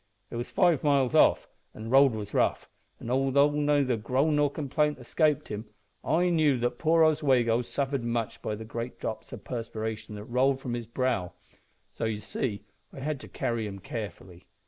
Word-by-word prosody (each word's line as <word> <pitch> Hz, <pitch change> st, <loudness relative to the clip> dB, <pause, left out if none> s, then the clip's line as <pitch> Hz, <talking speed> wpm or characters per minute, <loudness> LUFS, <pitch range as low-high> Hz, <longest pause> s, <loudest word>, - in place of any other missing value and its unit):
It -, -, -6 dB
was 120 Hz, +1 st, -4 dB
five 175 Hz, -6 st, +3 dB
miles 140 Hz, -4 st, +3 dB
off, -, -, +4 dB, 0.3 s
and 110 Hz, -, -8 dB
the -, -, -5 dB
road 135 Hz, -1 st, +6 dB
was 105 Hz, -2 st, -6 dB
rough, -, -, +1 dB, 0.3 s
and 120 Hz, -, -5 dB
although 135 Hz, +2 st, +3 dB
neither 145 Hz, -4 st, +2 dB
groan 135 Hz, +7 st, +1 dB
nor 145 Hz, -1 st, +3 dB
complaint 150 Hz, +1 st, 0 dB
escaped 150 Hz, +4 st, 0 dB
him, 105 Hz, +1 st, -5 dB, 0.4 s
I 175 Hz, +4 st, +2 dB
knew 155 Hz, -5 st, +3 dB
that 120 Hz, 0 st, -2 dB
poor 165 Hz, 0 st, +4 dB
Oswego 130 Hz, -7 st, +3 dB
suffered 135 Hz, +1 st, -2 dB
much 115 Hz, -1 st, -2 dB
by 105 Hz, -, -3 dB
the 110 Hz, +1 st, -8 dB
great 115 Hz, +2 st, -6 dB
drops 110 Hz, -, -5 dB
o' -, -, -6 dB
perspiration 110 Hz, -3 st, -5 dB
that 105 Hz, -, -7 dB
rolled 130 Hz, +3 st, +2 dB
from 125 Hz, -3 st, -4 dB
his 120 Hz, -2 st, -4 dB
brow; 115 Hz, -7 st, -1 dB, 0.6 s
so, -, -, -4 dB
you 110 Hz, -1 st, -1 dB
see, 105 Hz, 0 st, -4 dB, 0.3 s
I -, -, -10 dB
had 150 Hz, 0 st, -2 dB
to -, -, -10 dB
carry 115 Hz, -2 st, -2 dB
him 100 Hz, -1 st, -7 dB
carefully. 95 Hz, -4 st, -8 dB
125 Hz, 185 wpm, -28 LUFS, 110-145 Hz, 0.6 s, road